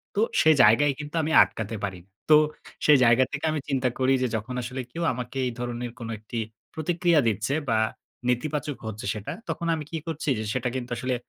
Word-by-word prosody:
তো 210 - +2 0.2
সে 160 - +6
জায়গায় 120 +7 +5
কিন্তু 150 +2 -7
আমি 160 - -1
আটকাতে 115 0 -5
পারি। 95 -2 -3 0.3
তো 155 - +9 0.5
সেই 150 -2 +7
জায়গা 120 +3 +5
থেকে 145 +2 -3
আমি 155 - -1
চিন্তা 130 -2 +1
করি, 130 +1 +3
যে - - +2
যখন 110 +4 -4
আসলে 125 +2 -4
কেউ 170 +4 -4
আমাকে 125 +2 -6
এই 125 - -1
ধরনের 120 0 -4
কোন 115 - -6
একটি 110 +2 -7 0.4
প্রতিক্রিয়া 170 0 +2
দিচ্ছে 110 +5 0 0.2
বা 110 - +3 0.5
নেতিবাচক 145 +3 -1
হচ্ছে 110 +2 -6
সেটা 105 -1 -6 0.2
তখন 170 - -2
আমি 155 - -5
কি 165 - -2
করছি, 160 -2 -3
যে - - -2
সেটা 125 -1 -1
কিন্তু 125 -1 -4
আসলে 130 -1 -1
130 Hz, 195 wpm, -26 LUFS, 120-150 Hz, 0.5 s, তো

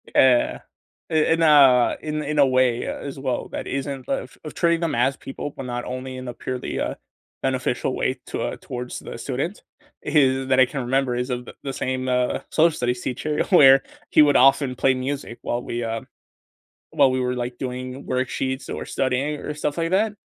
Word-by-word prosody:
Yeah, 130 -2 +4 0.5
i - - -4
in 160 +1 +3
a 140 -6 +6
in 155 0 -3
in 150 +1 -1
a 140 - +7
way, 130 -2 +2
uh, - - -3
as 140 -1 -7
well, 130 -2 -2
that - - -5
isn't 135 -1 -4
of 130 - -3
of 155 - -7
treating 170 -1 +1
them 165 -5 0
as 130 +3 +1
people, 140 +1 -7
but 135 - -6
not 120 -1 -4
only 130 0 -5
in 130 0 -7
a 120 - -4
purely, 125 +1 -4
uh, - - -2 0.5
beneficial 130 -1 -1
way 130 0 -1
to, - - -4
uh - - -3
towards 125 0 -6
the - - -8
student 135 - -4 0.4
is 135 -3 +2
that 130 0 +4
I 130 - +8
can 135 +2 -4
remember 130 0 0
is 125 +2 -2
of 125 -1 -3
the - - -10
the 135 - -4
same, 130 0 -2
uh, 125 0 +1
social 160 0 +3
studies 125 0 -1
teacher 150 +4 -1
where 135 -7 +7 0.3
he - - +6
would 145 -2 +5
often 135 0 +4
play 130 +1 +3
music 130 -1 -4
while 120 - -2
we, 120 0 -3
um 115 0 -4 0.9
while 140 -4 +5
we 130 0 0
were, 125 0 0
like, 120 0 -4
doing 130 +1 -5
worksheets 130 +1 -2
or - - -5
studying 135 +3 -1
or 150 - -5
stuff 150 +1 -3
like 165 0 0
that, 205 +3 +2
130 Hz, 200 wpm, -23 LUFS, 125-145 Hz, 0.9 s, I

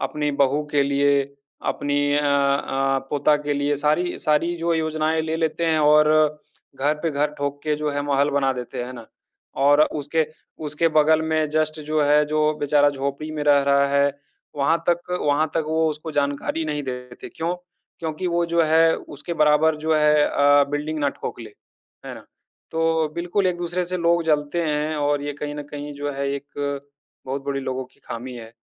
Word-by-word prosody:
अपनी 150 -1 -1
बहु 140 +3 +2
के 145 -1 +3
लिए, 140 0 +2 0.5
अपनी 145 0 -1 0.2
अ 145 - +3
अ, 140 -1 +1
पोता 145 +1 +3
के 145 0 -3
लिए। 145 +1 0
सारी 155 +5 0
सारी 160 +3 +1
जो 170 0 0
योजनाएँ 160 0 0
ले 160 0 -2
लेते 165 0 -1
हैं 160 -1 +2
और 150 0 +5 0.7
घर 145 +3 +1
पे 165 - 0
घर 145 0 0
ठोक 145 0 -3
के 155 -1 0
जो 150 0 -2
है 145 0 -2
महल 145 0 +1
बना 135 -1 +1
देते 125 -1 -5
है 130 - -8
ना? 120 -3 -10 0.5
और 145 +2 +4 0.2
उसके 155 +2 0 0.4
उसके 150 +3 +1
बगल 155 0 +3
में 155 -1 0
जस्ट 155 0 0
जो 155 0 +1
है 150 +1 +4
जो 155 +1 -1 0.2
बेचारा 145 0 +4
झोपड़ी 140 +2 -4
में 155 -1 -4
रह 145 -1 +5
रहा 140 0 +3
है, 140 0 +3 0.5
वहाँ 150 +4 +2
तक 175 +1 0 0.2
वहाँ 145 +2 +3
तक 165 - 0
वो 160 0 +2
उसको 155 +1 -6
जानकारी 145 +3 -1
नहीं 150 -1 -2
देते। 125 -2 -7
क्यों? 170 +2 -3 0.4
क्योंकि 160 +2 -4
वो 170 0 +1
जो 170 0 +2
है 160 +1 +4
उसके 150 +4 -7
बराबर 150 +1 +3
जो 160 - +2
है 150 -1 +4
अ, 145 0 +4
बिल्डिंग 150 +2 -2
ना 145 - +1
ठोकले। 115 -4 -7 0.6
है - - -6
ना? - - -12 0.5
तो 160 -1 +1
बिल्कुल 175 +3 0
एक-दूसरे 175 0 -1
से 185 +1 -3
लोग 170 0 +2
जलते 150 +2 0
हैं 150 +1 -1
और 145 -1 0
ये 145 0 -3
कहीं 145 0 -3
न 150 - -5
कहीं 145 0 -6
जो 145 0 -3
है 140 0 -2
एक 140 0 -5 0.4
बहुत 135 +1 -4
बड़ी 140 -1 -2
लोगों 130 -1 -3
की - - -27
खामी 125 +2 -6
है। 115 -1 -10
150 Hz, 190 wpm, -23 LUFS, 140-160 Hz, 0.7 s, और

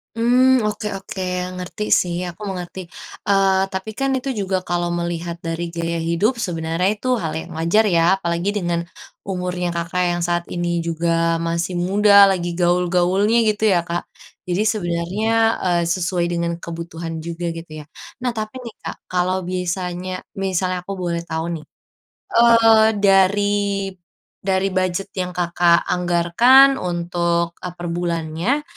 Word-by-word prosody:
Mmm. 250 +3 +4
Oke 210 0 -3
oke, 190 0 -7 0.3
ngerti 180 +3 -5 0.2
sih, 175 -1 -2
aku 175 +4 -13
mengerti. 180 0 -6 0.5
Eee, 195 -1 +3
tapi 190 +3 -4
kan 270 0 +1
itu 260 +1 -4
juga 190 -1 0
kalau 175 0 -1
melihat 170 0 -4
dari 165 +1 -2
gaya 170 0 -2
hidup 170 +9 +1
sebenarnya 170 -4 -1
itu - - -5 0.2
hal 160 - -2
yang 170 - -9
wajar 170 +7 +3
ya. 165 - +4 0.2
Apalagi 170 +2 -1
dengan 170 -1 -1 0.4
umurnya 180 -2 -3
Kakak, 170 +2 -1
yang 175 - -2
saat 175 0 0
ini 175 0 -2 0.2
juga 165 0 0
masih 170 +2 -2
muda, 200 +2 +6
lagi 175 -2 -1
gaul-gaulnya 180 +5 +2 0.2
gitu 210 - -6
ya, 175 - +4
Kak. 170 +1 -2 0.4
Jadi 180 +3 0
sebenarnya, 185 +1 -1 0.3
eee, 175 -2 +2
sesuai 175 0 0
dengan 170 0 -1
kebutuhan 165 0 -6
juga 170 +1 -4
gitu 165 -1 -9
ya. 150 - -10 0.3
Nah, 250 -1 -1
tapi 215 +3 -5
nih, 235 -3 -9
Kak, - - -5
kalau 185 +1 0
bisanya 180 0 -3 0.2
misalnya 185 -2 -1
aku 200 - -7 0.2
boleh 170 0 -2
tahu 165 0 -3
nih, 155 - -8 0.7
eee, 230 -2 +6
dari, 200 0 +2 0.5
dari 190 0 0
budget 185 +1 -1
yang 180 0 -3
Kakak 175 -1 +3
anggarkan 180 +11 +4
untuk, 170 -1 -1
e - - -6
perbulannya 175 - -2
180 Hz, 140 wpm, -20 LUFS, 170-195 Hz, 0.7 s, muda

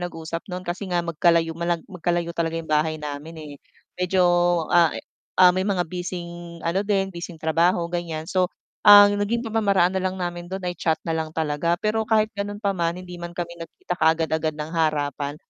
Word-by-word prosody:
nag-uusap 165 -1 -5
no'n 180 0 -5
kasi 180 +3 -4
nga 175 -1 0
magkalayo 170 0 +2
mala 170 +1 -1
magkalayo 175 -2 -2
talaga 165 -1 -2
'yong 165 -1 -6
bahay 155 +1 +2
namin 150 +2 -7
eh, 155 -2 -9 0.5
medyo 180 0 +2 0.5
a 170 -2 +4
e - - -8 0.3
ah, 180 -1 +7
may 185 +2 -1
mga 185 -3 +1
bising 175 -1 -7
ano 170 +4 +1
din, 195 -2 0
bising 170 0 -7
trabaho 165 +2 +2
ganiyan, 165 -3 -3
so, 180 +2 +1 0.3
ang 205 0 +8
naging 235 +4 -1
pamamaraan 200 -5 +2
na 190 - -1
lang 185 0 -2
namin 175 -1 -4
do'n 190 0 -5
ay 180 - -1
chat 160 -2 0
na 165 - -1
lang 160 -1 -2
talaga, 160 +2 0
pero 215 +3 -1
kahit 215 -1 +2
ganun 205 0 -4
pa 200 -2 0
man 170 -2 -1
hindi 180 -1 -9
man 175 0 -7
kami 170 -1 -4
nagkita 165 +2 -6
kaagad-agad 160 -1 +1
ng 155 +2 -6
harapan, 145 -3 -1
175 Hz, 190 wpm, -23 LUFS, 160-185 Hz, 0.5 s, ang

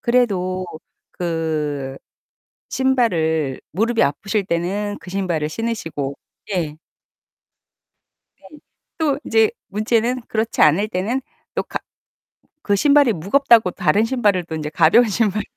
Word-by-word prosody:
그래도 185 -7 +1 0.5
그 155 -5 -2 0.7
신발을 165 - +1
무릎이 225 +6 +1
아프실 195 +7 -1
때는 200 +4 -2
그 180 - -11
신발을 175 -6 -1
신으시고 165 -10 -3 0.4
예. 160 -5 -2 1.6
네. 300 - -16 0.4
또 290 -4 0
이제 225 -1 +4 0.2
문제는 230 +4 0
그렇지 225 +1 -1
않을 165 +8 +5
때는 220 +7 -2 0.3
또 - - 0
가 - - -5 0.9
그 205 -1 +3
신발이 285 0 +4
무겁다고 220 - +3
다른 205 +9 +2
신발을 210 -8 +1
또 160 -1 -7
인제 150 -1 -4
가벼운 170 +10 +5
신발 215 -1 0
200 Hz, 235 characters per minute, -20 LUFS, 165-230 Hz, 1.6 s, 않을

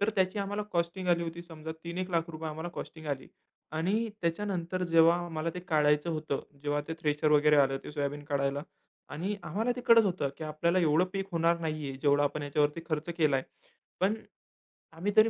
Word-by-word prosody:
तर 205 +2 +2
त्याची 190 +1 +2
आम्हाला 205 +1 -2
कॉस्टिंग 175 +2 -1
आली 170 -1 +3
होती. 170 +1 -5
समजा 160 -2 -7
तीन 170 +1 -4
एक 185 0 -2
लाख 170 -1 0
रुपये 160 0 -5
आम्हाला 160 +3 -5
कॉस्टिंग 160 -1 -7
आली. 135 -2 -3 0.4
आणि 200 +9 +1
त्याच्यानंतर 180 0 -1
जेव्हा 165 0 +6
आम्हाला 165 -1 -2
ते 180 - -4
काढायचं 150 +1 +3
होतं 155 -3 -2 0.2
जेव्हा 145 0 0
ते 160 - -2
थ्रेशर 150 -1 +1
वगैरे 150 0 +5
आलं 135 -1 +4
ते - - -6
सोयाबीन 145 0 -2
काढायला 140 0 0 0.5
आणि 190 +7 -2
आम्हाला 225 +9 0
ते 250 - -3
कळत 230 -1 +8
होतं 180 -7 0
की 160 - -6
आपल्याला 170 +4 +1
एवढं 165 0 +4
पीक 195 -1 -2
होणार 170 0 +3
नाही 155 -3 -2
आहे. 135 - -5
जेवढा 145 0 +4
आपण 145 +1 -1
ह्याच्यावरती 150 +2 +1
खर्च 155 +1 -1
केलाय. 140 -4 +3 0.6
पण 195 +3 +3 0.8
आम्ही 170 +6 -2
तरी 220 +1 +8
165 Hz, 190 wpm, -30 LUFS, 150-180 Hz, 0.8 s, कळत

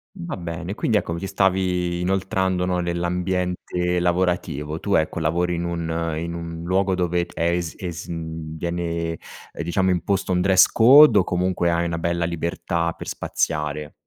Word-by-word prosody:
Mh, 180 -3 -7
va 170 - -4
bene. 85 +2 -5
Quindi, 110 -2 +1
ecco, 85 - -2
mi 85 - -4
ci 95 - -4
stavi 90 -2 +1
inoltrando, 95 0 0
no, 90 0 0
nell'ambiente 90 0 -1
lavorativo. 85 -4 -1
Tu, 100 - -2
ecco, 80 +1 0
lavori 85 +3 0
in 85 - -2
un 85 -1 -2
in 85 +1 -4
un 85 0 -6
luogo 95 +2 +1
dove 90 -1 0
è 85 +1 0
es 85 -2 -3
es 85 -2 -6
mhmm, 80 -1 -6
viene, 85 -1 -2 0.4
uhm, - - -5
diciamo, 95 +3 +1
imposto 95 +1 0
un 90 - +2
dress 95 0 +6
code, 130 +1 +7
o - - +3
comunque 90 -1 0
hai 85 0 +1
una 85 -1 -2
bella 85 0 -1
libertà 85 0 -2
per - - -9
spaziare? 75 -1 -2
85 Hz, 170 wpm, -23 LUFS, 85-90 Hz, 0.4 s, code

